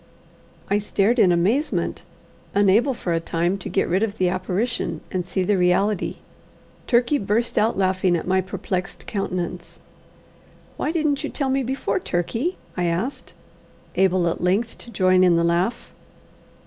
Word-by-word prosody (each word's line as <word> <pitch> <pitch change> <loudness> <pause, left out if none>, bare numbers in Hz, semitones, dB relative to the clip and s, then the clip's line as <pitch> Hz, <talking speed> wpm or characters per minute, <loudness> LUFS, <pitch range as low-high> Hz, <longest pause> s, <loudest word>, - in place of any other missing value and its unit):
I 205 +1 +2
stared 210 +3 +1
in 180 - +6
amazement, 205 - +1 0.5
unable 205 +7 +4
for 175 -6 -2
a 165 - +1
time 170 +3 -1
to - - -6
get - - +1
rid 185 +3 +1
of 220 -1 -1
the 185 -1 +2
apparition 185 +6 -2
and 185 -2 -1
see 185 +1 -2
the 195 +1 +1
reality. 180 +3 +1 0.7
Turkey 245 +4 +3
burst 215 +4 0
out 220 -1 +2
laughing 185 -1 +2
at - - -5
my 190 +1 +2
perplexed 185 0 -4
countenance. 180 -3 -4 1.0
"Why - - -1
didn't 305 -3 0
you 300 - -2
tell 275 -3 -1
me 270 +1 +1
before, 265 +8 -1
Turkey?" 230 - -2 0.2
I 180 - 0
asked, 230 +11 -3 0.6
able 185 -1 +2
at 170 - -2
length 200 +6 0
to - - -12
join 185 -4 +3
in 180 -2 +5
the 170 - +2
laugh. 175 +8 0
190 Hz, 155 wpm, -23 LUFS, 180-235 Hz, 1.0 s, in